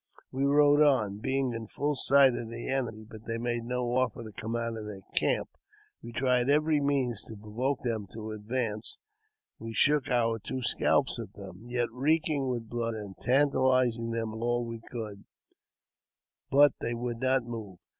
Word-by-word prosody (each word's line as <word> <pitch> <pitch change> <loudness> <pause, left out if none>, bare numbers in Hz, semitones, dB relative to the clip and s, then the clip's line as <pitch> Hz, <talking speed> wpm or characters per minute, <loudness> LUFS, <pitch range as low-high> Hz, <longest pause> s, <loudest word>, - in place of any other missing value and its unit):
We 135 +1 0
rode 145 +1 +5
on, 115 -9 +3
being 130 +1 0
in 115 -1 -5
full 145 +7 -1
sight 135 -1 +5
of 115 -1 -4
the 115 0 -6
enemy, 120 -5 -1
but 110 0 -12
they 115 0 -2
made 120 0 -2
no 125 0 -1
offer 130 -2 0
to 110 - -9
come 110 +3 -4
out 115 -1 -2
of 110 -1 -6
their 100 -2 -8
camp. - - +1 0.5
We 120 - -8
tried 125 +1 +1
every 150 +1 +3
means 135 -6 +1
to 110 - -9
provoke 115 +6 -2
them 110 -4 -2
to 110 -1 -6
advance; 110 0 -3 0.6
we 115 0 -6
shook 145 -2 +3
our 115 -3 +2
two 130 +4 -5
scalps 130 +1 +2
at 105 -3 -7
them, 95 -3 -10
yet 120 -1 -1
reeking 145 +1 +1
with 120 -3 -3
blood, 115 0 -2
and 100 -3 -7
tantalized 130 -3 +3
them 115 -1 -2
all 120 +2 -1
we 115 -1 -6
could; 105 -4 -6 1.3
bu^ 145 +1 +7
they 120 - -1
would 120 0 -3
not 130 0 +2
move. 110 -6 -7
120 Hz, 175 wpm, -29 LUFS, 110-130 Hz, 1.3 s, bu^